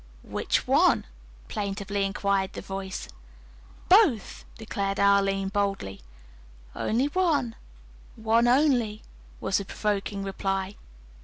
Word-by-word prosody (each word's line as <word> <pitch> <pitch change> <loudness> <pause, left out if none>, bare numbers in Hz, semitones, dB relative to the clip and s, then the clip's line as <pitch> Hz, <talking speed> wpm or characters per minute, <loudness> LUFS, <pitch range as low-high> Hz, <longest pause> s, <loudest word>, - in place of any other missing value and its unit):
"Which - - -1
one?" - - +4 0.4
plaintively 200 - -2
inquired 195 -1 0
the - - -6
voice. 195 -1 -5 0.8
"Both," 360 - +4
declared 200 -3 -3
Arline 195 -1 +3
boldly. 195 - -2 0.7
"Only 235 +5 +1
one, 290 -7 +1 0.6
only 235 +1 +3
one," 215 - -18 0.4
was 190 +1 0
the 200 - -5
provoking 200 -1 -2
reply. 195 0 -2
200 Hz, 95 wpm, -27 LUFS, 195-225 Hz, 0.8 s, one